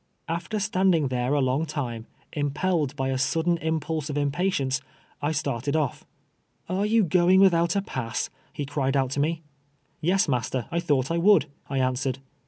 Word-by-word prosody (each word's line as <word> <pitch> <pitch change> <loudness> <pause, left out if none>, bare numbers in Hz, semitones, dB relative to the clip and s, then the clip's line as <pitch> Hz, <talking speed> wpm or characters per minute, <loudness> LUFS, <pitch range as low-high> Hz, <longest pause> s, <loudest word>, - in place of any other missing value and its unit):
After 170 +6 -2
stand 190 -3 +2
ing 150 -5 +1
there 125 +2 0
a 145 - +2
long 135 +5 +1
time, 120 -7 -4 0.3
impelled 145 0 0
by 135 -2 -1
a 130 -1 -1
sudden 165 +5 +1
impulse 160 -1 -2
of 145 - -2
impatience, 145 -2 0 0.4
I 145 - 0
started 140 -2 -1
oil". 150 -5 +1 0.4
" - - -44
Are 195 +3 0
you 225 0 +4
going 180 +2 +4
without 170 -3 +4
a 200 - +1
pass? 125 - -3
" - - -34
he 145 - -4
cried 140 -1 0
out 130 -1 +1
to 140 - -2
me. 160 +3 0 0.3
" - - -42 0.3
Yes, 185 +4 +2
master, 125 -2 -1
I 170 - +1
thought 140 -4 +1
I 170 - +1
would," 200 +3 +5 0.2
I 135 - -2
answered. 130 0 0
150 Hz, 190 wpm, -26 LUFS, 135-170 Hz, 0.4 s, would